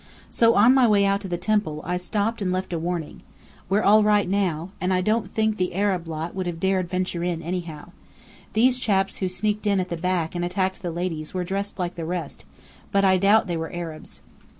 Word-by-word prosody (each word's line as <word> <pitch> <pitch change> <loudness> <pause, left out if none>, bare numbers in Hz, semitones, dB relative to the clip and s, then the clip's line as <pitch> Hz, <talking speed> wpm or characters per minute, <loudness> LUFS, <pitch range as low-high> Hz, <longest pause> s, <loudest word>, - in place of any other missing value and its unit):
So 230 0 +4
on 225 +5 +6
my 260 -2 +5
way 205 -2 +4
out 200 0 +1
to 195 - -6
the 175 -1 -2
temple 180 -5 0
I 180 +1 -1
stopped 210 +5 -2
and 185 -2 0
left 185 0 -2
a 165 - -1
warning. 170 -2 -4 0.5
We're 200 +3 +2
all 215 +2 +6
right 210 -2 +3
now. 185 -3 -1
And 185 +1 0
I 185 - +2
don't 215 +5 0
think 220 -1 0
the 180 -1 -1
Arab 190 -4 0
lot 160 +1 -4
would 185 -2 -3
have 170 -2 -4
dared 190 -1 0
venture 180 -2 -2
in 170 -2 -2
anyhow. 170 -2 -5 0.6
These 250 +3 +3
chaps 195 -5 +1
who 185 - -1
sneaked 210 +3 -1
in 200 -1 +3
at 185 0 -2
the 170 - -3
back 175 -1 -1
and 175 -1 -2
attacked 185 +1 -1
the 175 - -3
ladies 165 -1 -4
were 180 - -1
dressed 200 +3 -3
like 180 -2 -2
the 165 - -5
rest, 170 -3 -5 0.5
but 200 0 +3
I 190 -1 +5
doubt 200 +4 +4
they 175 -3 -2
were 160 0 -4
Arabs." 165 -3 -8
185 Hz, 220 wpm, -24 LUFS, 175-200 Hz, 0.6 s, on